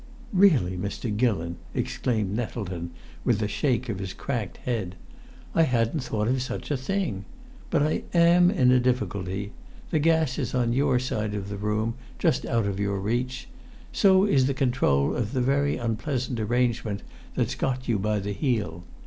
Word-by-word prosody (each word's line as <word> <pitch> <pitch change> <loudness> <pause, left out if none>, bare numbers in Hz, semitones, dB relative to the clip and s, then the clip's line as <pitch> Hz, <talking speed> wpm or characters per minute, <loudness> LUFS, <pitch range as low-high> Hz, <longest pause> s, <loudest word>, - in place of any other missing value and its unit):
"Really, 155 - +4
Mr. 105 +3 -3
Gillon!" 95 -8 0 0.2
exclaimed 110 -5 -1
Nettleton, 95 -7 -4 0.3
with - - +2
a - - +1
shake 125 +3 0
of 110 -5 -3
his 95 -1 -4
cracked 115 -8 -4
head. 105 -7 -2 0.6
"I 165 - +4
hadn't 125 -1 +2
thought 110 -4 -1
of 130 +1 +1
such 130 - -4
a - - +2
thing. 130 - -2 0.4
But - - +2
I 155 - +1
am 175 +1 +6
in 130 -11 +4
a 130 - +5
difficulty. 100 -5 -1 0.4
The 155 - +2
gas 160 -3 +2
is - - -2
on 120 -2 +2
your 135 0 +3
side 110 -4 -2
of 100 -1 -4
the 100 - -4
room, 105 +2 -1 0.2
just 165 - +1
out 115 -4 +1
of 100 -1 -2
your 100 -1 0
reach. 120 +5 -2 0.4
So 190 -1 +5
is 135 -10 +3
the 140 - 0
control 120 - +2
of 120 0 -2
the 130 - +1
very 140 +3 +2
unpleasant 120 +1 -2
arrangement 115 -2 0 0.3
that's - - 0
got 130 -1 -2
you 115 -4 +1
by 105 +2 0
the 100 0 -3
heel. 100 - -1
120 Hz, 170 wpm, -26 LUFS, 100-130 Hz, 0.6 s, am